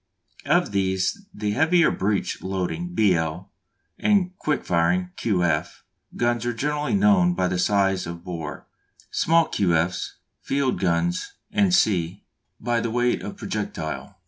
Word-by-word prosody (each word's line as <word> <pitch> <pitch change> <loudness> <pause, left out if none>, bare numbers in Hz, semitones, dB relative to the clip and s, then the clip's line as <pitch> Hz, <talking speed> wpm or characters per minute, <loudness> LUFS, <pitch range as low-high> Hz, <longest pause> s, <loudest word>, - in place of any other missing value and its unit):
Of - - +2
these 95 - -1
the 105 0 -3
heavier 160 +7 +3
breech 100 0 -1
loading 95 - -3
(B. 105 -4 +4
L.) 80 +2 -3 0.5
and 190 -3 +2
quick 150 -1 -1
firing 180 - +1
(Q. 95 -6 0
F.) 85 - -1 0.3
guns 120 -1 0
are 120 - 0
generally 150 - -1
known 195 -3 +4
by 90 - +1
the 90 0 -1
size 95 -1 +1
of 85 0 -7
bore; 80 -4 -6 0.5
small 165 +1 +3
Q. 90 -5 +1
F.'s, 85 +3 -1 0.3
field 135 -1 0
guns, 85 -1 0 0.4
&c., 95 - +1 0.4
by 120 +1 0
the 115 - -2
weight 120 +1 +1
of - - -7
projectile. 80 +5 -5
105 Hz, 140 wpm, -24 LUFS, 90-150 Hz, 0.5 s, B